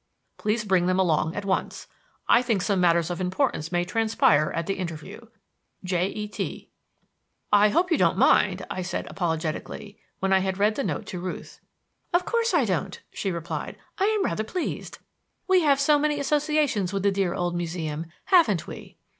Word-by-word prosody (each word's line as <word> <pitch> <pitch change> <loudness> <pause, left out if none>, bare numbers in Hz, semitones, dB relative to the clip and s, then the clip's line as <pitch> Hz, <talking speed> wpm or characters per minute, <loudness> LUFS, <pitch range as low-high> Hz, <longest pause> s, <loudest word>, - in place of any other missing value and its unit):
Please 215 +1 -1
bring 185 -3 +2
them 185 0 +2
along 160 -2 +1
at 205 - -4
once. 190 -1 -2 0.4
I - - +6
think 225 -7 0
some 200 -2 +1
matters 170 -1 +3
of 175 - -4
importance 180 - -1
may 175 -1 +1
transpire 185 -7 +2
at 165 - -2
the 195 - -1
interview 170 +6 -7 0.6
J. 180 0 0
E. 210 +1 -5
T._" 210 - -6 0.8
"I 205 +1 +6
hope 350 - +1
you 330 - +3
don't - - +3
mind," - - +3
I 185 - -4
said 180 0 -3
apologetically, 170 +4 -4 0.2
when 190 0 0
I 190 - +5
had 190 0 -2
read 210 +2 +3
the 275 - -2
note 225 - -3
to 185 -3 -6
Ruth. 180 +1 -7 0.6
"Of 360 - +2
course 465 -1 +1
I 325 -9 +3
don't," 190 -1 -2
she 195 - -2
replied. 170 0 -5 0.2
"I 385 - +3
am 425 -2 +1
rather 215 - -1
pleased. 330 +11 -4 0.5
We 375 -1 +4
have 285 -3 +3
so 290 +1 +4
many 295 0 0
associations 295 - +1
with 195 -1 -2
the 200 - +3
dear 190 -3 0
old 175 0 -1
Museum, 165 -2 -3 0.2
haven't 320 - +4
we?" - - -10
195 Hz, 180 wpm, -25 LUFS, 175-255 Hz, 0.8 s, I